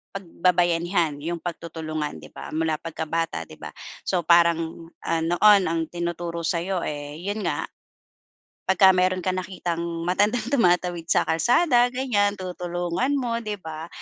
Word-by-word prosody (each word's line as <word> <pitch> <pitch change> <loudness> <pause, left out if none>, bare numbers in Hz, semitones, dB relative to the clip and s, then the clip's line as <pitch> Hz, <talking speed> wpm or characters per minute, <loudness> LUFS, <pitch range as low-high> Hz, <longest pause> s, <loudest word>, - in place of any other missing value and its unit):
pagbabayanihan, 175 -3 +1
yung 170 +3 -4
pagtutulungan, 155 - -5
di 75 - -12
ba, - - -9
mula 160 -1 0
pagkabata, 165 - -3
di 80 - -14
ba? - - -7 0.4
So 180 -2 +1
parang, 165 -1 +3 0.2
ah, 165 - 0
noon 185 +4 +5
ang 165 -1 -2
tinuturo 170 0 -3
sa'yo 175 +3 -1
eh, 145 0 -6
yun 205 +3 -3
nga, 165 -4 -1 1.0
pagka 190 0 +6
meron 185 0 +1
kang 185 0 0
nakitang 180 -2 -4 0.2
matandang 205 +6 +1
tumatawid 180 -8 +2
sa - - +3
kalsada, 245 - +3
ganyan, 205 -6 +1
tutulungan 180 +6 -2
mo, 240 -4 -1
di 215 -2 -4
ba? 160 -3 -8
175 Hz, 135 wpm, -24 LUFS, 165-190 Hz, 1.0 s, pagka